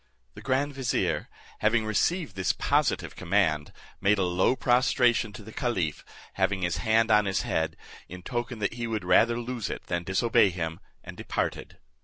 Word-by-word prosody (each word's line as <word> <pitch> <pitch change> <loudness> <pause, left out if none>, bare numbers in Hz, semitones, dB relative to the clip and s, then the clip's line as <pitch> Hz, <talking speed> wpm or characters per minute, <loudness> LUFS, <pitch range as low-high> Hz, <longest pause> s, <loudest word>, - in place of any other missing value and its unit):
The - - -11
grand 135 +2 0
vizier, 130 -3 -1 0.3
having 110 +1 +2
received 140 - 0
this 95 -2 +1
positive - - 0
command, 85 -5 0 0.3
made 100 +2 +3
a 95 - +1
low 90 +7 +2
prostration 125 -2 +2
to 105 - -10
the 110 - -11
caliph, 90 - -2 0.3
having 95 -2 0
his 85 -2 0
hand 110 +1 +2
on 105 -1 +5
his 95 -1 0
head, 80 0 -1 0.3
in 90 0 -9
token 120 0 -3
that 105 -1 -1
he 120 0 -4
would 110 -4 -3
rather 115 +6 +4
lose 120 -2 -4
it - - -5
than 85 -1 -2
disobey 100 +3 +3
him, 80 -3 -4 0.2
and - - -9
departed. - - -4
110 Hz, 170 wpm, -27 LUFS, 90-120 Hz, 0.3 s, on